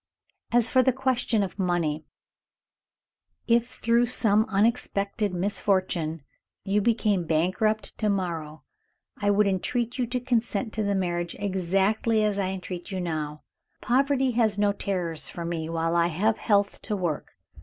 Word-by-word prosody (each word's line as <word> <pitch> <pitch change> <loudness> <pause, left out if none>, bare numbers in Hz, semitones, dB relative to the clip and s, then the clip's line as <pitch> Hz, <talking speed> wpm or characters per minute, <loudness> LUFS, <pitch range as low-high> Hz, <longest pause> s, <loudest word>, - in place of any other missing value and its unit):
As 240 -1 +4
for 260 - +4
the 260 - +3
question 250 -4 +1
of 195 +1 -6
money, 165 -5 0 1.4
if 235 0 +3
through 235 0 +1
some 220 -2 +2
unexpected 205 -1 0
misfortune 180 -4 0 0.4
you 200 +2 +2
became 215 -3 +2
a - - -6
bankrupt 185 +7 0
to 215 - +1
morrow, 165 -6 -3 0.5
I 205 - 0
would 205 0 +4
entreat 235 +6 -1
you 245 - +1
to 250 +2 -2
consent 235 -3 -1
to 215 - -1
the 200 -1 0
marriage 175 -2 -2
exactly 195 +3 +1
as 210 -1 0
I 195 - 0
entreat 185 -1 -6
you 190 -2 -3
now. 155 -3 -4 0.4
Poverty 270 +1 +2
has 225 -3 +1
no 205 0 +3
terrors 180 -5 -2
for 170 - -6
me 165 -1 -3
while 165 0 -1
I 170 0 +4
have 200 +7 0
health 200 -2 +1
to 210 - -3
work. 175 -6 -3
200 Hz, 150 wpm, -26 LUFS, 175-225 Hz, 1.4 s, As